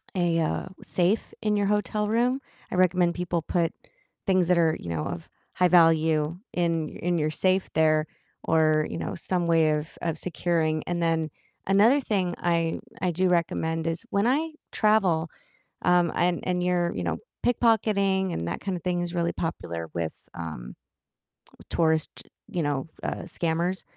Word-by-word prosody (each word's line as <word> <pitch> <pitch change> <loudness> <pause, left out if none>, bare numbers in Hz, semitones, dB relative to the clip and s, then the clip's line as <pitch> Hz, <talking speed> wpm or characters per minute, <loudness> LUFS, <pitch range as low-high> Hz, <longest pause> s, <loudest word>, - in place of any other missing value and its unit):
a, 175 -2 +2
uh, 160 - -1 0.2
safe 185 +5 0
in 210 -1 +1
your 205 -1 +1
hotel 210 0 0
room, 245 +4 +2 0.3
I - - -2
recommend 180 -1 +3
people 175 -1 -1
put 170 -1 0 0.5
things 185 -2 +3
that 180 - +4
are, 160 -1 +3
you 85 - -7
know, 80 -2 -2
of 165 - -5 0.3
high 180 - +4
value 160 -2 +4 0.2
in 165 -3 0
in 175 0 -2
your 155 -1 0
safe 185 +4 +1
there 155 -1 +3 0.4
or, 155 -1 +3
you - - -4
know, - - -3
some 175 0 -1
way 165 -2 +4
of 150 0 -1
of 165 -2 -2
securing, 165 -3 0
and 175 -1 -1
then 160 -1 +1 0.4
another 210 +8 +5
thing 190 -7 0
I 170 -1 0 0.2
I 180 -1 +1
do 185 +3 +1
recommend 165 -2 0
is 165 0 -3
when 200 +1 +2
I 305 +6 +1 0.2
travel, 190 -7 +2 0.5
um, 175 -1 +4
and 175 0 +2
and 180 -1 0
you're, 175 -1 +1
you 90 - -2
know, 85 -2 -1 0.3
pickpocketing, 200 -6 +2
and 85 - -3
that - - -4
kind 195 -2 -2
of 170 - -9
thing 180 -1 0
is 175 0 -4
really 170 0 0
popular 85 - -4
with, 85 -2 -2 0.2
um, 75 -8 -7 1.0
tourist, 160 -2 +1 0.3
you 175 - -1
know, 145 0 -1 0.2
uh, - - -3
scammers, 170 +2 -1
170 Hz, 165 wpm, -26 LUFS, 160-185 Hz, 1.0 s, another